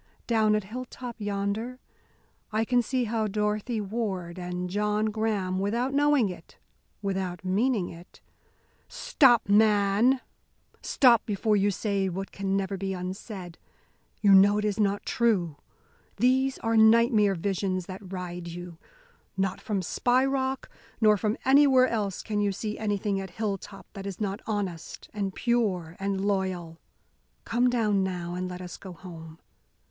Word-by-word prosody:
Down 220 -2 +3
at 210 - 0
Hilltop 245 +2 -7
yonder 205 +5 -2 0.7
I 220 +1 +1
can 245 +1 +3
see 255 +2 -1
how 220 -1 -1
Dorothy 210 +3 -1
Ward 195 -4 -3
and 180 0 -4
John 210 +3 0
Graham, 205 -4 -1
without 235 +7 -1
knowing 290 -4 +3
it, 175 -3 -10 0.5
without 190 -2 -3
meaning 205 +1 +1
it 170 +2 -13 0.4
" - - -39 0.2
"Stop, 270 - +5
man!" 205 0 +4
I - - -3
cried. - - -24 0.6
"Stop, 240 -4 +5
before 210 +1 +1
you 205 0 +3
say 200 -1 -1
what 195 +2 -5
can 195 0 -1
never 195 0 -2
be 195 0 -3
unsaid. 185 -1 -7 0.6
You 200 -2 +6
know 200 +2 +7
it 210 - -1
is 210 0 -1
not 200 -1 +1
true. 190 -10 +1 0.6
These 260 +4 +2
are 225 0 +1
nightmare 220 -2 +5
visions 185 0 -2
that 190 0 -9
ride 180 -2 -5
you. 170 -1 -8 0.6
Not 190 0 -1
from 200 -4 -2
Spy 250 +8 +2
Rock 265 -1 -1 0.3
nor 215 -2 +5
from 210 +3 -1
anywhere 265 -1 +6
else 210 -6 -2
can 210 -2 -1
you 205 -1 +1
see 210 +2 -4
anything 205 -2 -1
at 190 - -7
Hilltop 200 0 -5
that 195 -1 -7
is 195 -3 -6
not 200 -1 -2
honest 195 -6 -4
and 200 -3 -3
pure 195 -9 0
and 195 0 -1
loyal. 185 -5 -2 0.7
Come 245 +2 +2
down, 215 -5 +1
now, 175 -2 -3
and 180 +1 -3
let 180 0 -7
us 180 - -8
go 190 -2 -10
home. 165 -3 -11
205 Hz, 150 wpm, -27 LUFS, 190-225 Hz, 0.7 s, know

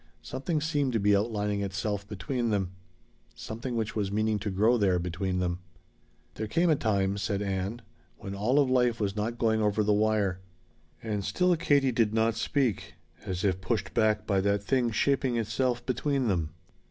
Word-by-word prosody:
Something 135 - -2
seemed 145 -5 0
to 115 - +2
be 100 0 +4
outlining 105 -1 0
itself 100 +1 -3
between 115 +5 -2
them. 95 -4 0 0.6
Something 120 +3 -5
which 110 -2 -2
was 100 -3 -1
meaning 110 0 +1
to 105 - -3
grow 105 +5 +3
there 100 -5 +2
between 90 +2 -2
them. 90 -1 -1 0.7
"There 110 - -4
came 170 +9 +2
a - - +5
time," 100 -5 0
said 100 +1 -1
Ann, 100 +4 -3 0.3
"when 100 - -7
all 110 +8 +1
of 145 -2 +4
life 125 -2 +2
was 100 -2 -1
not 110 +3 -2
going 110 -2 +2
over 105 0 +2
the 105 0 +3
wire." 105 -3 +1 0.6
And 105 -3 -2
still 180 - +2
Katie 145 -5 +2
did 115 -2 +1
not 115 +1 +3
speak, 120 - -1 0.3
as 90 -1 -3
if 95 -2 +1
pushed 100 +4 -2
back 110 -1 +2
by 100 -2 +1
that 100 +1 +1
thing 125 +2 +1
shaping 130 +2 +1
itself 120 +2 -1
between 135 0 0
them. 85 -7 0
110 Hz, 175 wpm, -28 LUFS, 100-120 Hz, 0.7 s, a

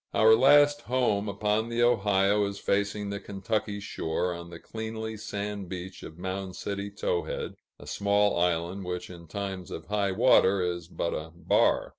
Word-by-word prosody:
Our 110 0 +7
last 145 +4 +6
home 115 -5 0
upon 105 +3 0
the 120 0 +1
Ohio 105 -3 +3
is 100 0 -4
facing 100 +1 -1
the 100 - -3
Kentucky 100 +1 -3
shore, 90 -3 -2
on 85 0 -8
the 85 - -9
cleanly 110 0 -5
sand 105 -2 -5
beach 95 0 -7
of 80 - -10
Mound 95 +1 -4
City 100 0 -4
Towhead, 95 -3 -2 0.3
a - - -11
small 100 +6 +2
island 90 +2 0
which 90 0 -5
in 85 -1 -11
times 95 0 -5
of 80 - -7
high 100 -2 0
water 100 -2 +5
is 85 -2 -2
but 85 -1 -2
a 75 +1 -4
bar. 85 - +2
100 Hz, 165 wpm, -28 LUFS, 90-105 Hz, 0.3 s, Our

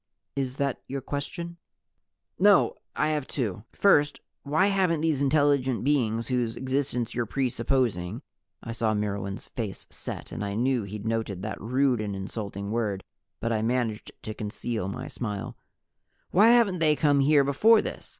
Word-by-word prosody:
"Is 135 -1 -2
that 140 -2 -1
your 135 +1 -3
question?" 170 +6 -5 0.8
"No, 200 -1 +5 0.2
I 150 - +1
have 150 -3 -1
two. 105 -6 -3
First, 150 -8 +3 0.2
why 155 +6 +2
haven't 185 -5 +2
these 155 -4 +1
intelligent 140 -3 +2
beings 115 -5 +1
whose 120 -3 0
existence 130 -2 -1
you're 120 -1 -1
presupposing 120 - 0 0.2
" - - -35
I 115 - -5
saw 115 -2 0
Myrwan's 100 +2 -3
face 110 -5 -5
set, - - -6
and - - -4
I 100 0 -3
knew 125 -1 +1
he'd 105 +1 -7
noted 110 -4 -2
that 105 -1 -5
rude 125 +1 +2
and 105 -2 -3
insulting 100 0 -5
word, 105 -4 -1 0.4
but 115 0 -1
I 110 - 0
managed 115 -2 -1
to 110 - -4
conceal 110 -1 -3
my 125 +6 -5
smile 105 -5 -5 0.8
"why 205 +4 +6
haven't 230 -6 +5
they 155 -2 +4
come 145 -2 +3
here 140 +1 +5
before 210 +12 +5
this? - - -6
125 Hz, 160 wpm, -27 LUFS, 110-145 Hz, 0.8 s, why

